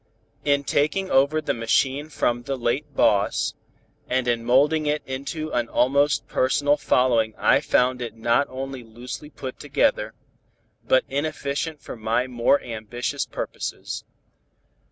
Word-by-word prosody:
In 140 Hz, -1 st, +2 dB
taking 155 Hz, +7 st, 0 dB
over 140 Hz, +4 st, +3 dB
the 155 Hz, -, -1 dB
machine 130 Hz, +6 st, +1 dB
from 120 Hz, -5 st, 0 dB
the 135 Hz, +2 st, -3 dB
late 125 Hz, +4 st, -2 dB
boss, -, -, +2 dB, 0.6 s
and 130 Hz, 0 st, 0 dB
in 120 Hz, -1 st, +1 dB
molding 145 Hz, +6 st, +3 dB
it 150 Hz, +1 st, 0 dB
into 140 Hz, +4 st, -4 dB
an 120 Hz, -1 st, -1 dB
almost 140 Hz, +3 st, +2 dB
personal 145 Hz, +3 st, +2 dB
following 125 Hz, -6 st, +2 dB
I -, -, +4 dB
found 125 Hz, 0 st, +2 dB
it 115 Hz, -2 st, -5 dB
not 120 Hz, +5 st, +2 dB
only 135 Hz, 0 st, -5 dB
loosely 120 Hz, +5 st, -8 dB
put 130 Hz, -3 st, -8 dB
together, 110 Hz, -6 st, 0 dB, 0.7 s
but 130 Hz, -, +3 dB
inefficient 145 Hz, +1 st, -3 dB
for -, -, -7 dB
my 115 Hz, +2 st, 0 dB
more 125 Hz, +2 st, +2 dB
ambitious 115 Hz, +1 st, -4 dB
purposes. -, -, -5 dB
130 Hz, 135 wpm, -24 LUFS, 120-145 Hz, 0.7 s, I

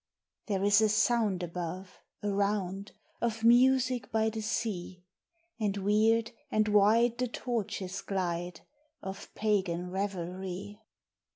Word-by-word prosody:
There 195 Hz, -3 st, 0 dB
is 205 Hz, +1 st, +5 dB
a 215 Hz, -, +4 dB
sound 215 Hz, -3 st, +2 dB
above, 180 Hz, +2 st, -6 dB, 0.2 s
around 200 Hz, -1 st, -1 dB, 0.3 s
Of 230 Hz, -1 st, -1 dB
music 250 Hz, +1 st, +4 dB
by 220 Hz, 0 st, +1 dB
the 220 Hz, 0 st, -4 dB
sea; 185 Hz, -5 st, -3 dB, 0.6 s
And 205 Hz, -2 st, 0 dB
weird 215 Hz, +3 st, +2 dB, 0.2 s
and 215 Hz, -4 st, +2 dB
wide 225 Hz, +4 st, +4 dB
the 250 Hz, -, +1 dB
torches 205 Hz, -6 st, -3 dB
glide 175 Hz, -3 st, -3 dB, 0.4 s
Of 195 Hz, 0 st, -7 dB
pagan 185 Hz, -4 st, 0 dB
revelry. 190 Hz, +1 st, -4 dB
205 Hz, 110 wpm, -30 LUFS, 185-220 Hz, 0.6 s, is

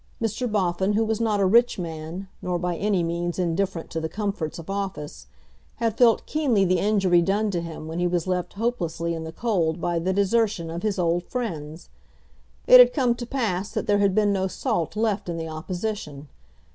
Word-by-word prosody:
Mr. 230 Hz, +1 st, -2 dB
Boffin, 190 Hz, 0 st, +1 dB
who 220 Hz, +2 st, +2 dB
was 220 Hz, 0 st, -1 dB
not 215 Hz, -3 st, +1 dB
a 195 Hz, -, +3 dB
rich 235 Hz, +6 st, +4 dB
man, 165 Hz, +2 st, -6 dB
nor 180 Hz, -1 st, -1 dB
by 175 Hz, 0 st, -2 dB
any 195 Hz, -1 st, 0 dB
means 170 Hz, +1 st, -2 dB
indifferent 180 Hz, 0 st, -1 dB
to 160 Hz, -, -3 dB
the 160 Hz, -, -3 dB
comforts 195 Hz, -4 st, -3 dB
of 165 Hz, -, -9 dB
office, 190 Hz, -, -5 dB, 0.5 s
had 230 Hz, -2 st, -1 dB
felt 235 Hz, -1 st, +4 dB
keenly 260 Hz, -11 st, +1 dB
the 185 Hz, -1 st, +2 dB
injury 195 Hz, -4 st, +3 dB
done 205 Hz, +4 st, +1 dB
to 175 Hz, -3 st, -1 dB
him 165 Hz, -2 st, -7 dB
when 165 Hz, +2 st, -4 dB
he 175 Hz, -, +2 dB
was 175 Hz, -2 st, -1 dB
left 180 Hz, -1 st, -2 dB
hopelessly 175 Hz, -7 st, -2 dB
in 160 Hz, -1 st, -5 dB
the 160 Hz, -, -6 dB
cold 175 Hz, -5 st, 0 dB
by 170 Hz, 0 st, 0 dB
the 180 Hz, +3 st, 0 dB
desertion 200 Hz, -3 st, +1 dB
of 170 Hz, +1 st, -4 dB
his 210 Hz, -1 st, -1 dB
old 175 Hz, -1 st, +1 dB
friends. 165 Hz, -, -5 dB, 0.8 s
It 255 Hz, -, +9 dB
had 245 Hz, 0 st, +8 dB
come 255 Hz, -5 st, +2 dB
to 240 Hz, 0 st, -7 dB
pass 210 Hz, -8 st, -1 dB
that 215 Hz, -, -2 dB
there 205 Hz, 0 st, +2 dB
had 200 Hz, -2 st, +2 dB
been 210 Hz, -1 st, +3 dB
no 190 Hz, -1 st, 0 dB
salt 200 Hz, -, -2 dB
left 210 Hz, -3 st, -1 dB
in 170 Hz, -, -3 dB
the 165 Hz, 0 st, -4 dB
opposition. 160 Hz, -3 st, -5 dB
190 Hz, 200 wpm, -24 LUFS, 170-215 Hz, 0.8 s, It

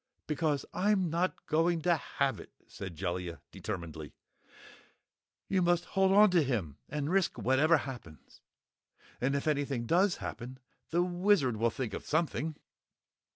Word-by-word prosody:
"Because 150 Hz, -2 st, 0 dB
I'm 190 Hz, -3 st, +2 dB
not 175 Hz, +3 st, -1 dB
going 165 Hz, +1 st, +1 dB
to 175 Hz, 0 st, +4 dB
have 140 Hz, -5 st, -1 dB
it!" -, -, -12 dB
said 95 Hz, -4 st, -8 dB
Jellia 90 Hz, 0 st, -3 dB
determinedly. 80 Hz, -7 st, -6 dB, 1.3 s
"You 190 Hz, -1 st, +1 dB
must 175 Hz, 0 st, +2 dB
hold 190 Hz, 0 st, +4 dB
on 205 Hz, 0 st, +7 dB
to 175 Hz, -2 st, +4 dB
him 105 Hz, -, -2 dB
and 150 Hz, +1 st, -2 dB
risk 190 Hz, -1 st, +1 dB
whatever 145 Hz, +6 st, +4 dB
happens! 120 Hz, -, -9 dB, 0.8 s
And 135 Hz, +3 st, +1 dB
if 140 Hz, -, -2 dB
anything 140 Hz, -5 st, 0 dB
does 180 Hz, -, +3 dB
happen, 125 Hz, +2 st, -7 dB, 0.3 s
the 175 Hz, +2 st, +2 dB
Wizard 175 Hz, -, +2 dB
will 115 Hz, +2 st, +2 dB
think 125 Hz, -1 st, -4 dB
of -, -, -6 dB
something!" 155 Hz, -1 st, 0 dB
150 Hz, 140 wpm, -31 LUFS, 120-175 Hz, 1.3 s, on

